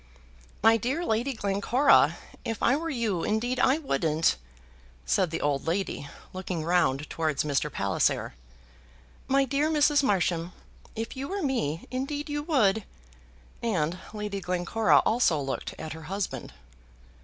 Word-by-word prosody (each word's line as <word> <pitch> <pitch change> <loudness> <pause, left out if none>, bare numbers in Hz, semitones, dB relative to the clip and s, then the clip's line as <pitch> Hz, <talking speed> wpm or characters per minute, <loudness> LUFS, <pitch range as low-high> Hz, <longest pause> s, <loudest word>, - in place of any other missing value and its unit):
"My 225 +1 +6
dear 270 +10 -2
Lady 230 +5 0
Glencora, 220 +6 +3 0.3
if 225 -3 -4
I 255 - +4
were 330 +3 -3
you, 225 - -1
indeed 240 +4 0
I 270 - +4
wouldn't," 160 - +1 0.7
said 185 -4 +2
the 165 - -3
old 145 -1 0
lady, 165 -5 -2 0.2
looking 185 -3 -4
round 160 -5 +2
towards 155 -3 -1
Mr. 150 0 0
Palliser. 100 -4 0 0.9
"My 275 +1 +3
dear 280 +4 +1
Mrs. 295 -2 +4
Marsham, 180 -7 0 0.4
if 225 +4 -4
you 270 +1 -4
were 390 0 -3
me, 230 - -1
indeed 285 +3 -3
you 295 0 -1
would," 220 - +2 0.8
and 180 -7 0
Lady 210 -2 -4
Glencora 180 +5 +2
also 220 -9 +3
looked 135 -1 -4
at 160 -1 -6
her 160 -1 -10
husband. 195 0 -3
210 Hz, 135 wpm, -27 LUFS, 165-265 Hz, 0.9 s, My